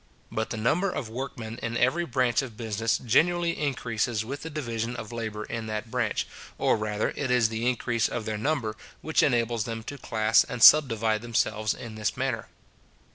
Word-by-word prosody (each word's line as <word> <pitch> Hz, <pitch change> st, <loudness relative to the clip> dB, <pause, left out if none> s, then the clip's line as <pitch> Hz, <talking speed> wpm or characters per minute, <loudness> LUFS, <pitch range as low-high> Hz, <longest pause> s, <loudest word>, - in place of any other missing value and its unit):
But 110 Hz, 0 st, -2 dB
the 115 Hz, -, -4 dB
number 155 Hz, -, +1 dB
of 140 Hz, -10 st, -4 dB
workmen 115 Hz, -2 st, -6 dB
in 115 Hz, +1 st, -2 dB
every 145 Hz, +9 st, +2 dB
branch 125 Hz, -1 st, +2 dB
of 120 Hz, -5 st, -8 dB
business 115 Hz, 0 st, 0 dB
generally 170 Hz, +8 st, +2 dB
increases 120 Hz, -5 st, -1 dB
with 140 Hz, +4 st, -5 dB
the 160 Hz, -, -6 dB
division 120 Hz, -6 st, -3 dB
of 120 Hz, -1 st, -7 dB
labour 110 Hz, -2 st, -4 dB
in 115 Hz, 0 st, -5 dB
that 110 Hz, +1 st, -4 dB
branch; 120 Hz, -4 st, 0 dB, 0.3 s
or -, -, +3 dB
rather 105 Hz, -1 st, -1 dB
it 140 Hz, -, -2 dB
is 125 Hz, -3 st, +3 dB
the 115 Hz, +2 st, 0 dB
increase 120 Hz, -2 st, 0 dB
of 115 Hz, -, -4 dB
their 110 Hz, -1 st, -3 dB
number 115 Hz, -4 st, -1 dB, 0.3 s
which 160 Hz, -, +2 dB
enables 120 Hz, -4 st, +1 dB
them 115 Hz, -1 st, -5 dB
to 140 Hz, +5 st, -7 dB
class 110 Hz, -1 st, +3 dB
and 120 Hz, -, -3 dB
subdivide 115 Hz, -7 st, +6 dB
themselves 110 Hz, -2 st, 0 dB
in 115 Hz, -2 st, -8 dB
this 110 Hz, -1 st, -2 dB
manner. -, -, -2 dB
115 Hz, 185 wpm, -27 LUFS, 110-130 Hz, 0.3 s, subdivide